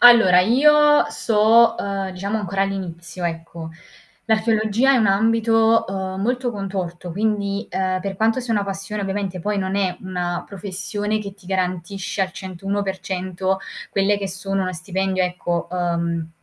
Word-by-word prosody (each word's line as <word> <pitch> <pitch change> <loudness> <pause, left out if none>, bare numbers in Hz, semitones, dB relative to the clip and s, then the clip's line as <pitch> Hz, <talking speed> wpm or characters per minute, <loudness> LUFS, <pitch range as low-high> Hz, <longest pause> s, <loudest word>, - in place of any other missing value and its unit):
Allora 230 -7 +8
io 295 +8 +5
so', 225 +1 +4
uhm, 195 -1 -2
diciamo 195 +3 -3
ancora 195 -1 -1
all'inizio 175 -3 -4
ecco. 165 -1 -5 0.6
L'archeologia 220 +2 +2
è - - +4
un 225 -4 +3
ambito, 225 +2 +3
uhm, 190 0 -3
molto 245 +3 0
contorto 190 -4 -4
quindi, 205 0 -1
uhm, 185 -1 0
per 195 0 -4
quanto 225 +4 +2
sia 240 -2 -3
una 205 -2 +1
passione 200 +2 -4
ovviamente, 195 -2 -3
poi 210 +4 -1
non 190 -1 -1
è 195 -3 0
una 180 -2 -3
professione 205 +2 -3
che 200 -2 -6
ti 190 -2 -20
garantisce 185 +1 -2
al 185 -1 0
101% 190 0 -3 0.3
quelle 200 +1 +2
che 195 -1 -3
sono 195 +1 -2
uno 185 0 -2
stipendio 190 +2 -1
ecco, 175 -1 -2
uhm, 170 -2 -1
195 Hz, 145 wpm, -21 LUFS, 185-210 Hz, 0.6 s, Allora